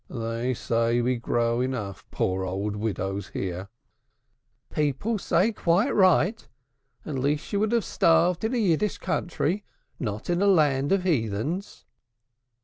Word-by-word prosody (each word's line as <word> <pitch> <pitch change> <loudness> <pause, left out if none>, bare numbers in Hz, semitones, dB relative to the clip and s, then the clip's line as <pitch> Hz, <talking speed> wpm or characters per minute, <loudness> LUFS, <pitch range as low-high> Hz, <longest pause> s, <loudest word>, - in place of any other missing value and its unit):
They 115 +1 -2
say 115 +1 +1
we 125 +1 +1
grow 115 0 0
enough 105 -7 -4
poor 95 0 -1
old 100 +3 -2
widows 100 -2 -3
here." 95 +1 -5 1.0
"People 150 - 0
say 190 +5 +2
quite 195 +4 +2
right 185 +2 +3 0.6
at 140 -4 -3
least 145 +3 0
she - - -5
would 215 +2 +1
have 235 -2 +1
starved 170 +2 +3
in, 225 +3 0
a - - +1
Yiddishë 205 -1 +1
country, 180 +1 -1 0.4
not 105 -4 -4
in 175 +1 +1
a 200 - +4
land 145 -7 +3
of 195 -2 +2
heathens." 145 - -2
140 Hz, 140 wpm, -26 LUFS, 115-185 Hz, 1.0 s, a